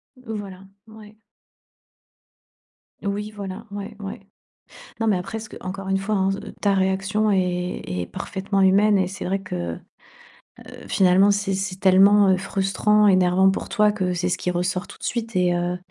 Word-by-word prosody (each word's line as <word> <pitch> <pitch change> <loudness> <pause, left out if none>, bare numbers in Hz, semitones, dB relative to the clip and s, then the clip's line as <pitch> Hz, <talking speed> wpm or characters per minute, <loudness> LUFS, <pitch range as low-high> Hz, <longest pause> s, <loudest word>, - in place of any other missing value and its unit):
Voilà. 205 -6 -8 0.2
Ouais. 215 -1 -14 1.9
Oui 205 +1 -3
voilà. 200 +2 -7
Ouais 200 0 -7
ouais. 195 -1 -6 0.8
Non 225 - 0
mais 210 - +3
après 185 +5 -4
ce 220 - -8
que - - -12
encore 190 +1 -6
une 195 - +1
fois 200 +2 -2
hein 190 0 +1
s 195 - -1
heu, - - -9
ta 200 -1 +2
réaction 195 +3 +1
est 180 -2 -1
est 90 -1 -3
parfaitement 195 - -3
humaine 200 +2 +4
et 185 -1 +1
c'est 190 - -7
vrai 195 +2 -1
que, 190 - -7 0.2
heu, - - -11 1.1
finalement 190 +2 +4
c'est 200 -1 -1
c'est 190 0 -4
tellement, 195 +1 +6
heu, 190 - +4
frustrant, 200 +2 +2
énervant 185 0 +4
pour 190 - -4
toi, 210 -2 +3
que 185 -3 -1
c'est 175 +1 -1
ce 180 - -1
qui 180 - -2
ressort 180 +2 -1
tout - - -13
de - - -21
suite 230 -2 -3
et 180 -1 +2
heu, 175 +1 -1
195 Hz, 175 wpm, -23 LUFS, 185-205 Hz, 1.9 s, tellement